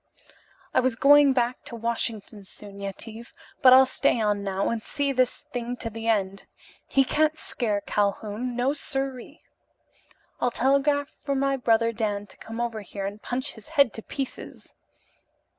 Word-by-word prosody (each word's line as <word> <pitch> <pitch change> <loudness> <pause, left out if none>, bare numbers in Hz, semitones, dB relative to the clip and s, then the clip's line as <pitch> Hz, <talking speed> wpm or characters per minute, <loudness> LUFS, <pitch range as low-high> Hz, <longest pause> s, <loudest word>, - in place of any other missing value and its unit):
I - - +4
was 255 -2 +1
going 285 +3 +6
back 245 -1 0
to 235 - -6
Washington 225 -2 -3
soon, 200 +1 -11
Yetive, 220 +4 -5 0.3
but 255 - +8
I'll 260 +1 +9
stay 255 -2 +2
on 205 -2 0
now 195 0 -1
and 230 -1 -2
see 285 +3 -2
this 255 -2 +1
thing 245 0 -5
to 230 -2 -5
the 225 +1 -6
end. 195 -3 0 0.4
He 270 - +3
can't 310 +3 +1
scare 225 -8 -1
a - - -4
Calhoun, 210 +5 -2
no 250 +3 +1
sir 270 -2 -3
ee. 285 +7 -14 1.0
I'll 245 - +2
telegraph 280 +3 +2
for 280 -1 -4
my 275 0 +1
brother 230 -2 +2
Dan 210 -2 -2
to - - -13
come 225 +1 -8
over 235 -2 -2
here 200 0 -6
and 205 +2 -6
punch 260 +3 -3
his 220 +2 -13
head 280 -5 +5
to 225 - -6
pieces." 270 +3 -7
235 Hz, 170 wpm, -26 LUFS, 215-270 Hz, 1.0 s, I'll